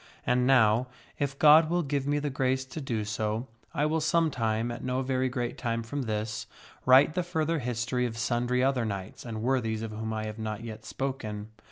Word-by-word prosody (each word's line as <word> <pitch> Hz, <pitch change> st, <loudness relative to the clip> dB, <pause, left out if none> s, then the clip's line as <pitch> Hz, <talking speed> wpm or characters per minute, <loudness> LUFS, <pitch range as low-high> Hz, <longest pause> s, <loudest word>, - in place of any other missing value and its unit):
And 125 Hz, 0 st, +2 dB
now, 120 Hz, -2 st, +4 dB, 0.3 s
if 140 Hz, -1 st, -1 dB
God 155 Hz, +2 st, +7 dB
will 175 Hz, +1 st, +1 dB
give 140 Hz, -1 st, -1 dB
me 145 Hz, 0 st, +2 dB
the 145 Hz, -1 st, -2 dB
grace 130 Hz, 0 st, 0 dB
to 130 Hz, +4 st, -7 dB
do 115 Hz, -6 st, -2 dB
so, 110 Hz, +2 st, -2 dB, 0.3 s
I 150 Hz, -2 st, 0 dB
will 160 Hz, +1 st, +1 dB
some 165 Hz, 0 st, +2 dB
time, 115 Hz, -1 st, 0 dB
at 120 Hz, -, -6 dB
no 130 Hz, +1 st, -1 dB
very 130 Hz, 0 st, 0 dB
great 125 Hz, -1 st, -3 dB
time 115 Hz, -2 st, -1 dB
from 140 Hz, +5 st, -4 dB
this, 110 Hz, -2 st, -3 dB, 0.4 s
write 135 Hz, +4 st, +7 dB
the 180 Hz, -, +1 dB
further 165 Hz, -2 st, -1 dB
history 125 Hz, 0 st, -1 dB
of 115 Hz, -1 st, -7 dB
sundry 120 Hz, +2 st, +1 dB
other 130 Hz, -2 st, +2 dB
knights 100 Hz, -3 st, -5 dB
and 110 Hz, -2 st, -5 dB
worthies 115 Hz, -4 st, 0 dB
of 110 Hz, -, -4 dB
whom 110 Hz, +1 st, -4 dB
I 110 Hz, 0 st, -2 dB
have 110 Hz, +1 st, -6 dB
not 110 Hz, 0 st, -4 dB
yet 110 Hz, -1 st, -8 dB
spoken. 110 Hz, -2 st, -4 dB
125 Hz, 205 wpm, -29 LUFS, 110-135 Hz, 0.4 s, God